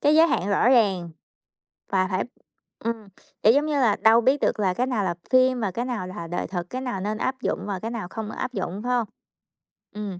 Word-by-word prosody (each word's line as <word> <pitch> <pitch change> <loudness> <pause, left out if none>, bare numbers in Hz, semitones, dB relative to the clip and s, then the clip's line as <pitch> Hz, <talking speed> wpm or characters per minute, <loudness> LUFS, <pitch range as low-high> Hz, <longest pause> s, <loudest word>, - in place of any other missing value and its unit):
cái 295 +1 +4
giới 320 +1 +7
hạn 195 - 0
rõ 205 +4 +3
ràng 195 -9 +3 0.8
và 185 -1 +2
phải 185 - +1 0.6
ừm, 225 -2 -4 0.4
kiểu, 220 - +7
giống 290 +3 +3
như 300 -2 0
là 220 -5 +4
đâu 225 +1 +5
biết 270 +4 +2
được - - +1
là 190 -3 +2
cái 250 +6 0
nào 235 -6 0
là 175 -2 -1
phim 255 -1 +4
và 200 - 0
cái 235 +7 -3
nào 235 -7 -3
là 185 -3 -7
đời 175 +1 -3
thực, 175 -2 -4
cái 255 - -4
nào 245 -7 -3
nên 210 +2 -2
áp 260 +3 -2
dụng - - -1
và 200 -2 -3
cái 225 +4 -4
nào 230 -6 -4
không 220 0 -5
áp 255 0 -4
dụng, 195 -1 -3
phải 250 - -1
hông? 235 - 0 0.9
Ừm. 205 -4 -5
220 Hz, 235 wpm, -25 LUFS, 190-250 Hz, 0.9 s, giới